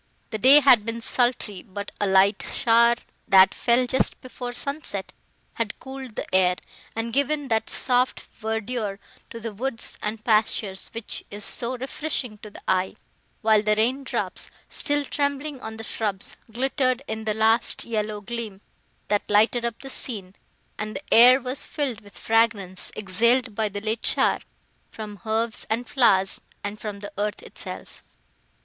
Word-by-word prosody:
The 220 - -3
day 275 +6 +8
had 250 -6 +6
been 230 +1 -3
sultry, 235 -5 0
but 200 0 -7
a 205 - +2
light 195 +1 +4
shower, 235 0 +5 0.3
that 190 -2 +7
fell 240 +1 +2
just 260 +1 +1
before 250 -1 -7
sunset, 245 -6 -3 0.4
had 225 -2 -3
cooled 265 -3 -8
the - - -3
air, 180 -1 +4 0.4
and 225 0 -3
given 285 0 +1
that 220 -1 +1
soft 250 0 +2 0.2
verdure 220 -1 -2 0.3
to 230 - -8
the 230 -1 -5
woods 235 +2 -4
and 215 +1 -4
pastures, 215 -3 +2
which 230 -2 -4
is 205 0 -6
so 250 +2 -1
refreshing 260 -4 -3
to 210 - -10
the - - -13
eye; 185 0 +1 0.5
while 215 -1 +5
the 210 0 +2
rain 250 +6 +1
drops, - - -2 0.2
still 290 -1 0
trembling 285 0 -2
on 220 0 -6
the 225 - -6
shrubs, 205 -3 -2 0.2
glittered 255 +1 0
in 220 0 -4
the 215 -1 0
last 225 +2 +3
yellow 215 -2 -2
gleam, 225 -2 -5 0.5
that 205 0 0
lighted 220 +3 +4
up 235 -1 -3
the 270 - -7
scene, 200 -9 -3 0.5
and 215 0 -4
the 290 - -3
air 250 +3 +9
was 255 +1 -3
filled 260 -7 -3
with 205 -1 -13
fragrance, 220 -5 +1
exhaled 230 +5 +2
by 215 0 0
the 205 0 -6
late 220 +1 -2
shower, - - +3 0.5
from 210 -2 -8
herbs 220 +1 -1
and 235 +2 -1
flowers 195 -8 +3 0.2
and 205 +1 -5
from 205 -2 -6
the 205 - -8
earth 210 0 -2
itself. - - -8
225 Hz, 160 wpm, -25 LUFS, 210-250 Hz, 0.5 s, air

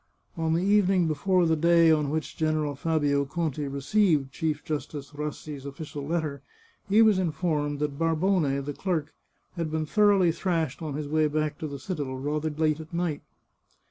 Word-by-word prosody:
On 160 -2 0
the 170 - +1
evening 195 -3 +3
before 175 +4 +2
the 160 -1 +3
day 165 +1 +5
on 150 -2 +2
which 155 +1 -3
General 155 -2 0
Fabio 145 -1 +1
Conti 150 -1 -2
received 140 0 +1
Chief 150 0 -2
Justice 145 -2 -5
Rassi's 150 -1 -6
official 145 +1 -7
letter 155 -4 -2 0.5
he 215 +3 +6
was 215 -4 +4
informed 155 -4 -1
that 145 -1 -3
Barbone, 165 -4 +1
the 145 +1 -4
clerk, 160 -3 -2 0.4
had 165 -2 -2
been 155 0 -1
thoroughly 200 -1 +4
thrashed 165 -5 -2
on 155 -3 -4
his 150 0 -4
way 155 +1 +2
back 150 0 -2
to 155 - -3
the 140 -1 -6
citadel, 140 -3 -4
rather 150 +3 -2
late 155 0 0
at 160 0 -10
night. 170 -3 -2
155 Hz, 170 wpm, -27 LUFS, 145-170 Hz, 0.5 s, he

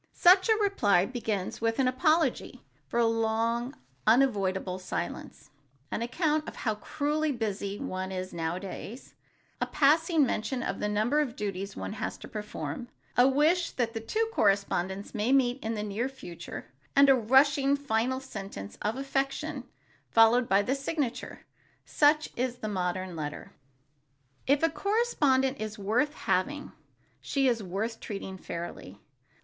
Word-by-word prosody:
Such 375 +4 +6
a 440 - +6
reply 230 - +3
begins 220 -6 -3
with 225 0 +1
an 265 -2 +3
apology 310 +6 +1 0.2
for 235 - -1
a 235 - +4
long 225 +1 +1
and - - -24 0.3
unavoidable 195 -6 +2
silence, 185 -2 -5 0.4
an - - -2
account 305 +5 0
of - - -12
how 220 - -1
cruelly 300 +6 -1
busy 205 -5 -3
one 185 -1 -4
is 185 0 -5
nowadays, 180 +8 -5 0.5
a - - +1
passing 315 +1 +3
mention 245 +2 -2
of - - -3
the 210 - -1
number 215 +8 +2
of 265 -5 -1
duties 200 -1 -4
one - - -5
has - - -4
to - - -10
perform, 210 -2 -5 0.3
a 245 +1 +6
wish 315 +6 +3
that 235 -2 -1
the 225 - -3
two 435 - -1
correspondents 200 - +1
may 220 +5 0
meet 265 -1 +2
in 225 +1 -2
the 210 - -3
near 215 +5 -2
future 180 -10 -9 0.3
and 280 0 +7
a 270 - +8
rushing 270 +3 +4
final 260 -2 0
sentence 195 - -8
of 215 +2 -1
affection 275 +1 -2 0.4
followed 230 +2 +5
by 195 +1 +4
the 255 - 0
signature. 275 -2 -3 0.4
Such 300 +1 +3
is 250 0 -1
the 220 - -5
modern 185 -2 -2
letter. 150 -2 -6 0.9
If 280 +3 +3
a 330 - +5
correspondent 290 - +1
is 215 0 -4
worth 235 +10 0
having, 285 +11 -1 0.5
she 275 -1 +1
is 235 -3 +1
worth 210 +5 -3
treating 195 -3 -6
fairly. 170 - -7
235 Hz, 150 wpm, -29 LUFS, 200-275 Hz, 0.9 s, a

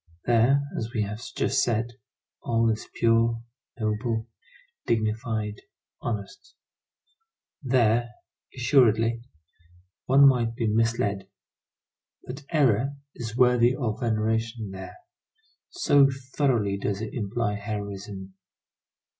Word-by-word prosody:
There, 120 +4 +4
as 110 +1 -3
we 110 - +2
have 105 +2 -5
just - - +1
said, 120 0 -1 0.5
all 115 -1 +2
is 110 - -5
pure, 115 0 +3 0.4
noble, 110 +1 -1 0.6
dignified, 110 -1 -1 0.4
honest. 105 -4 -6 1.1
There, 120 -3 +2 0.4
assuredly, 115 -3 +3 0.9
one 140 +2 +7
might 120 -3 +2
be 115 - -1
misled; 105 -3 0 1.0
but 135 +4 -8
error 135 -3 +2 0.2
is 115 -1 -6
worthy 125 0 +4
of 120 -6 -2
veneration 115 -1 -1
there, 95 0 -9 0.7
so 145 - +4 0.2
thoroughly 115 -9 +1
does 100 0 -2
it 110 - -5
imply 110 -1 -1
heroism. 100 -2 -6
115 Hz, 95 wpm, -26 LUFS, 105-120 Hz, 1.1 s, one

